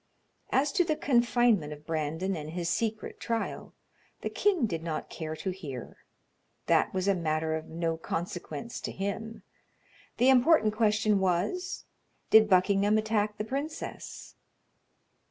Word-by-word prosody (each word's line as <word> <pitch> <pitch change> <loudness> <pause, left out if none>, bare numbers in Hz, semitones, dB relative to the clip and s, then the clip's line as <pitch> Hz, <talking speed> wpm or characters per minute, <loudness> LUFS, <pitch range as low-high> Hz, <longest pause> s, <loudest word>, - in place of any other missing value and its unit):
As 285 +2 +2
to 355 - +3
the 320 -3 0
confinement 240 - +2
of 150 0 -13
Brandon 160 +4 -2
and 155 -2 -6
his 170 +1 -3
secret 220 +4 -2
trial, 230 -1 -3 0.5
the - - -3
king 375 - +2
did 165 -6 -3
not 160 -2 -4
care 160 -1 -5
to 190 +4 -3
hear; 145 -10 -8 0.7
that - - +3
was 190 0 -1
a 200 - +5
matter 160 -2 -1
of 160 0 -4
no 165 0 -2
consequence 175 +8 -5
to - - -4
him; 220 +3 -4 0.7
the 250 +3 +5
important 260 -3 +5
question 215 -2 +3
was, 190 - -1 0.5
did 220 -1 +7
Buckingham 200 +3 +4
attack 215 -1 0
the 210 - -3
princess? 280 +7 -5
200 Hz, 135 wpm, -29 LUFS, 165-230 Hz, 0.7 s, did